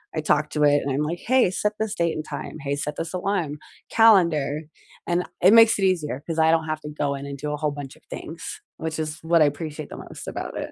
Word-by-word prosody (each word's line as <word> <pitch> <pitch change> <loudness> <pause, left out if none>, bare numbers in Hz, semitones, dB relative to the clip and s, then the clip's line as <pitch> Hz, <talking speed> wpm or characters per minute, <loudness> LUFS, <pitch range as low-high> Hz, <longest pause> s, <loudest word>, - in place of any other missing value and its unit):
I 155 - 0
talked 150 0 +1
to 150 - +1
it, 145 0 +5
and 140 - -2
I'm 135 +3 0
like, 170 +3 -3
"Hey, 255 -5 +3
set 210 +3 0
this 220 -1 -1
date 170 -1 +1
and 155 - -3
time. - - -6
Hey, 140 0 -1
set 145 +1 -4
this 165 +2 -4
alarm. 180 -5 -1 0.3
Calendar," 170 -10 +4 0.5
and 175 +1 +1 0.2
it 190 +5 +7
makes 230 0 +7
it 195 - 0
easier 155 -7 0
'cause 165 -1 -2
I 160 0 +5
don't 160 -1 +2
have 155 0 -3
to 150 - -7
go 145 -1 -1
in 140 - -7
and 140 0 -6
do 150 +2 -4
a - - -2
whole 150 0 0
bunch 140 -2 -8
of - - -22
things, 165 +2 -7 0.2
which 160 0 -4
is 155 0 -3
what 165 0 +3
I 150 - +7
appreciate 150 +1 -4
the - - -8
most - - -10
about - - -5
it. - - -5
155 Hz, 260 wpm, -24 LUFS, 150-175 Hz, 0.5 s, it